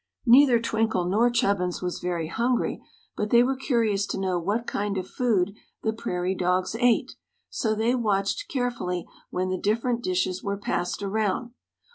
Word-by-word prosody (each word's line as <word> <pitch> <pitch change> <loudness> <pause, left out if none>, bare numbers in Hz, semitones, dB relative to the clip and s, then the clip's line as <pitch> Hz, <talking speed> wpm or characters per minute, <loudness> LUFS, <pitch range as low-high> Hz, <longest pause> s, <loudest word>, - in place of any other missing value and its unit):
Neither 250 0 +7
Twinkle 220 -5 0
nor 215 +7 +3
Chubbins 200 -7 0
was 180 -1 -3
very 175 -3 -2
hungry, 235 +8 0 0.3
but 210 - -2
they 240 +1 +6
were 265 +2 +1
curious 225 -7 0
to - - -3
know 185 -2 0
what 205 +7 -1
kind 205 -2 -2
of 185 0 -3
food 205 -6 +1 0.3
the 220 - +1
prairie 185 -5 -2
dogs 180 +2 0
ate, 245 -2 +2 0.4
so 220 -2 0
they 225 +3 +1
watched 210 - 0
carefully 240 - -2 0.2
when 185 +1 -2
the 185 -1 -2
different 230 +3 0
dishes 185 0 0
were 200 -1 -2
passed 185 0 -2
around. 215 +4 -1
210 Hz, 160 wpm, -26 LUFS, 185-235 Hz, 0.4 s, Neither